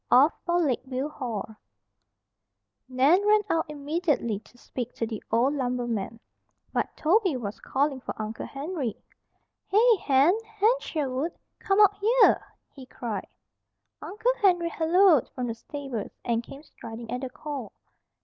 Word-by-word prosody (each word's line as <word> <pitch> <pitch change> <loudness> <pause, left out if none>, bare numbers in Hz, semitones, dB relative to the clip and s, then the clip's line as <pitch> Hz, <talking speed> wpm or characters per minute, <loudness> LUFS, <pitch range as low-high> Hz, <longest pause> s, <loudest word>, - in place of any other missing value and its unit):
OFF 275 +6 +6
FOR 345 0 +2
LAKEVIEW 265 -1 -1
HALL 225 -6 -5 1.3
Nan 275 +10 +4
ran 425 0 +5
out 330 +1 +1
immediately 295 - -1
to 235 +3 -22
speak 245 0 -6
to 230 - -1
the 220 -2 -5
old 240 +5 +3
lumberman; 240 -5 -2 0.5
but - - -2
Toby 360 - +2
was 210 -3 -5
calling 275 0 0
for - - -7
Uncle 215 +1 -4
Henry: 275 - -4 0.7
"Hey, 455 +4 +5
Hen! 285 +4 +4
Hen 440 +1 +2
Sherwood! 295 - -2 0.3
Come 395 -2 +1
out 410 -1 +6
yere," 465 +4 +5 0.3
he 265 -2 -12
cried. 225 -6 -5 0.7
Uncle 440 +5 0
Henry 350 -4 +3
halloaed 335 - +4
from 250 - -2
the 230 - -2
stables, 260 -2 -6
and 230 -1 +1
came 275 +5 -12
striding 230 -4 -9
at 250 +1 -3
the 260 - -4
call. 270 -4 -6
275 Hz, 140 wpm, -27 LUFS, 240-345 Hz, 1.3 s, OFF